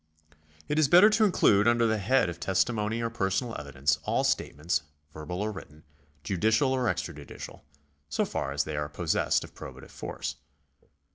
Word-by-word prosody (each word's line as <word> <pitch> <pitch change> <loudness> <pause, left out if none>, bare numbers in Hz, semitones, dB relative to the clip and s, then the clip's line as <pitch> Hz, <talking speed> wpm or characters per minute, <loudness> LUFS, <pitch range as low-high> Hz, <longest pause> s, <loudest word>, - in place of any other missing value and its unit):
It 150 - 0
is 155 - +4
better 180 +8 +7
to 215 0 +4
include 105 - +4
under 120 0 +4
the 110 -1 +1
head 125 +3 +2
of 85 -1 -6
testimony 105 +5 0
or 115 - -2
personal 115 +2 -1
evidence 70 +1 -1
all - - 0
state - - 0
ments, 75 0 0 0.3
verbal 90 +5 -5
or 110 - -2
written, 75 -6 -11 0.4
judicial 110 - +2
or 130 -1 0
extrajudicial, 75 -9 -5 0.5
so 75 - 0
far 70 - -3
as 70 +1 0
they 75 - -5
are 75 0 -2
possessed 80 +2 0
of - - -12
probative 65 0 -10
force. - - -5
100 Hz, 165 wpm, -28 LUFS, 75-120 Hz, 0.5 s, better